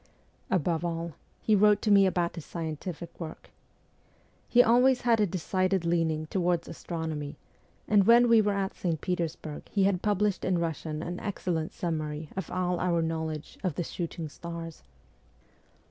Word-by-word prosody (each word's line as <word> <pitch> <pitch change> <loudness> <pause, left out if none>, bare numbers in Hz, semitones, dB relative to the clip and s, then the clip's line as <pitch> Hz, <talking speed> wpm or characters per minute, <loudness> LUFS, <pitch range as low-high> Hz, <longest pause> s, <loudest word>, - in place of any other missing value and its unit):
Above 170 -2 +1
all 170 -1 -3 0.3
he 215 - +3
wrote 210 0 +5
to 215 - 0
me 200 -1 +7
about 175 -2 0
his 165 - -7
scientific 165 +1 -6
work. 160 -2 -8 1.0
He 245 0 +7
always 250 +2 +4
had 235 -2 +3
a 210 - +3
decided 185 +1 0
leaning 165 -2 +1
towards 175 0 0
astronomy, 160 -3 -5 0.5
and 205 -2 +4
when 240 +1 +7
we 230 -2 +6
were 205 -1 +1
at 195 -1 -1
St. 165 -4 -2
Petersburg 165 -4 -4
he 200 - +1
had 190 -2 +2
published 205 -1 +1
in 185 - +1
Eussian 160 -1 -3
an 175 +1 -4
excellent 175 -6 -2
summary 155 -2 -3
of 190 - -4
all 180 -1 -1
our 170 -2 +1
knowledge 160 -2 -4
of 180 -6 -1
the 175 - -1
shooting 165 -1 -5
stars. 165 +1 -8
175 Hz, 155 wpm, -29 LUFS, 160-195 Hz, 1.0 s, me